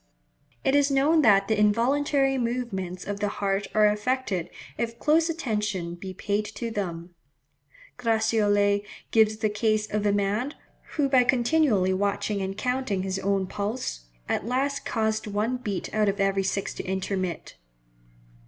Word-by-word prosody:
It 270 - +2
is 285 0 +4
known 285 +4 +4
that 200 -6 +5
the 220 -1 +1
involuntary 270 +6 +2
movements 230 -8 -3
of 205 0 -4
the 205 - 0
heart 200 -1 -1
are 215 0 +6
affected 210 -4 0 0.3
if 235 0 -3
close 320 +5 +3
attention 210 - -2
be 185 +2 -7
paid 205 +3 -1
to 235 -1 -4
them. 175 -4 -4 0.9
Gratiolet 215 -3 +2 0.3
gives 220 -1 +4
the 220 -1 0
case 215 0 +1
of 210 -1 0
a - - +3
man, 205 +8 0 0.4
who 290 -3 +2
by 260 -2 +5
continually 240 -6 +2
watching 200 +1 -1
and 190 +1 -4
counting 250 -5 -1
his 190 0 -2
own 195 0 0
pulse, 200 - -4 0.2
at - - -1
last 275 +3 -1
caused 220 -1 -1
one 210 +5 -1
beat 210 -6 -4
out 215 -1 +2
of 200 - -3
every 195 0 +2
six 195 +1 -2
to - - -6
intermit. 190 -1 -3
210 Hz, 150 wpm, -26 LUFS, 195-250 Hz, 0.9 s, are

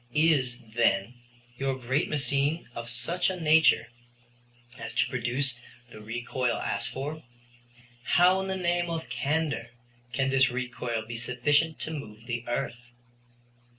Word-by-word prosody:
Is, 145 -6 +3 0.2
then, 115 -1 +2 0.5
your 135 -1 0
great 130 +4 0
machine 145 +2 0
of 115 0 -6
such 150 +11 0
a 185 -1 -3
nature 160 -6 +5 0.9
as - - -6
to - - +3
produce 125 +1 0 0.4
the 110 - -10
recoil 120 +3 -1
asked 100 0 -1
for? 150 +4 -5 0.8
How 180 +9 +4
in 190 - -3
the 190 0 -1
name 175 -1 +1
of 165 -1 -4
candor 150 -3 -1 0.4
can 130 +2 +1
this 135 -1 +5
recoil 125 -2 -3
be 115 +1 -6
sufficient 145 +7 +1
to 160 - -3
move 115 -8 -7
the 120 -1 -3
earth? 120 -1 -3
130 Hz, 135 wpm, -28 LUFS, 120-155 Hz, 0.9 s, nature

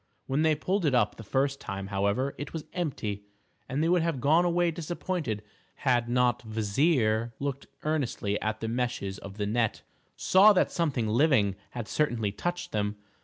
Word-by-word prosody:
When 135 +3 0
they 160 -1 +4
pulled 185 +6 -1
it 145 -5 +2
up 105 -4 +2
the 115 - -8
first 135 +5 0
time, 95 -4 -5
however, 100 +8 +1
it 145 - -6
was 160 -2 -5
empty, 120 - -3 0.5
and 140 +4 0
they - - +2
would 175 0 +3
have 165 -5 -1
gone 155 +7 +4
away 175 0 +2
disappointed 165 - -3 0.3
had 120 -3 +1
not 125 -1 +2
Kvasir, 110 +1 +1
looking 140 -1 -4
earnestly 130 -9 -1
at 110 0 -2
the 115 - -2
meshes 115 -5 -2
of 100 +1 -10
the 105 - -1
net, 110 +1 0 0.3
saw 200 +3 +6
that 185 - +2
something 140 -10 0
living 110 -4 +3
had 120 -3 -6
certainly 120 -9 0
touched 175 - -3
them. 105 -1 -1
125 Hz, 170 wpm, -28 LUFS, 110-155 Hz, 0.5 s, saw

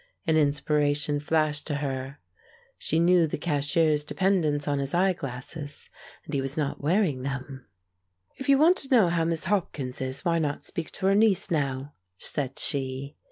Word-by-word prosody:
An 160 - +2
inspiration 145 0 +1
flashed 150 -1 0
to 150 - -1
her; 135 -1 -4 0.6
she 160 - -1
knew 175 -1 +4
the - - -3
cashier's 150 0 +1
dependence 155 -4 +1
on 145 -1 +1
his 140 +3 -2
eye 185 +2 +3
glasses, 145 +1 -7 0.3
and - - -9
he 140 - +1
was 135 +2 -2
not 145 -3 -2
wearing 155 -3 +1
them. 135 -1 -5 0.7
"If 270 +1 -5
you 275 - +7
want 330 +6 +5
to 270 - -6
know 225 -9 +5
how 170 -1 +1
Miss 165 -1 0
Hopkins 155 -10 -2
is, 130 +5 -4
why 170 -1 +2
not 145 -2 -2
speak 165 -2 -4
to - - -3
her 195 - +5
niece 200 -2 +3
now?" 140 -2 -1 0.2
said 135 +5 -3
she. 135 0 -3
150 Hz, 170 wpm, -27 LUFS, 140-170 Hz, 0.7 s, you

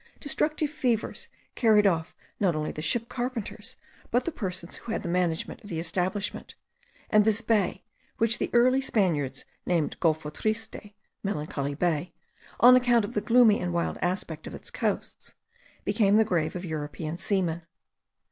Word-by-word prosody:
Destructive 305 0 0
fevers 250 -8 -1 0.3
carried 215 -3 +4
off 165 -5 +1 0.2
not 185 -5 +2
only 155 0 -2
the 155 - -6
ship 230 +9 0
carpenters, 245 -3 -5 0.3
but 245 - +1
the 340 - -1
persons 185 - -5
who 235 - -7
had - - -2
the - - -4
management 170 -2 -1
of 205 - -11
the 165 - -3
establishment; 185 +4 -2 0.6
and 215 -1 +6
this 220 +1 +3
bay, 210 -4 +1 0.3
which 230 0 +2
the - - -1
early 255 +2 +4
Spaniards 160 - 0 0.2
named 170 -4 0
Golfo 155 -3 0
Triste 215 0 -4 0.3
(Melancholy 150 -6 -3
Bay), 170 +1 -1 0.5
on 250 +1 +9
account 240 -3 +4
of - - -8
the 210 - 0
gloomy 230 -2 +5
and 175 -1 -2
wild 170 - -1
aspect 175 -3 -2
of - - -7
its - - -9
coasts, - - -3 0.5
became 205 -2 +3
the 220 - +5
grave 165 -6 0
of 180 +1 -4
European 155 +1 -4
seamen. 180 -4 0
195 Hz, 155 wpm, -27 LUFS, 165-230 Hz, 0.6 s, on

